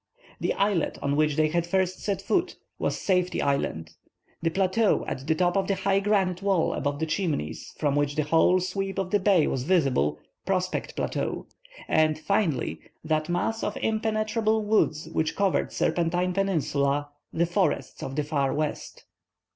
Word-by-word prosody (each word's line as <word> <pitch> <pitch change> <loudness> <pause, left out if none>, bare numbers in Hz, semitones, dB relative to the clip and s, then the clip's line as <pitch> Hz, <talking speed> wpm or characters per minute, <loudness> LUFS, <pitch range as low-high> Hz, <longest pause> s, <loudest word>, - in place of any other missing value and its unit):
The - - 0
islet 200 -5 +1
on 140 0 +1
which 150 -1 +2
they 155 +1 +3
first 185 +2 0
set 195 -2 -2
foot, 360 - 0 0.2
was - - -1
Safety 180 -2 +1
Island; 140 - -1 0.5
the 165 - +1
plateau 190 +4 +2
at 135 +3 -5
the 160 - +2
top 175 +1 +1
of 195 -1 +1
the 195 - +1
high 195 +1 +1
granite 195 -3 +1
wall 195 -4 +1
above 145 -1 -2
the 160 - -1
Chimneys, 155 - -3
from 145 -2 +1
which 145 0 0
the 155 - +1
whole 165 +4 +4
sweep 195 +2 -3
of 190 -1 -2
the 205 - +3
bay 190 -5 +4
was 130 - -1
visible, 130 - +2 0.3
Prospect 185 -1 -2
Plateau; - - -2 0.4
and, 155 -1 +3
finally, 155 - 0 0.2
that 155 0 0
mass 220 +6 -1
of - - -2
impenetrable 220 0 0
woods 185 -7 +1
which 160 0 -1
covered 200 -2 +1
Serpentine 175 +1 0
Peninsula, 145 -7 0 0.2
the 170 - +1
Forests 180 +3 -1
of 135 - -5
the 150 - 0
Far 145 -2 0
West. 150 0 -4
175 Hz, 165 wpm, -26 LUFS, 150-195 Hz, 0.5 s, whole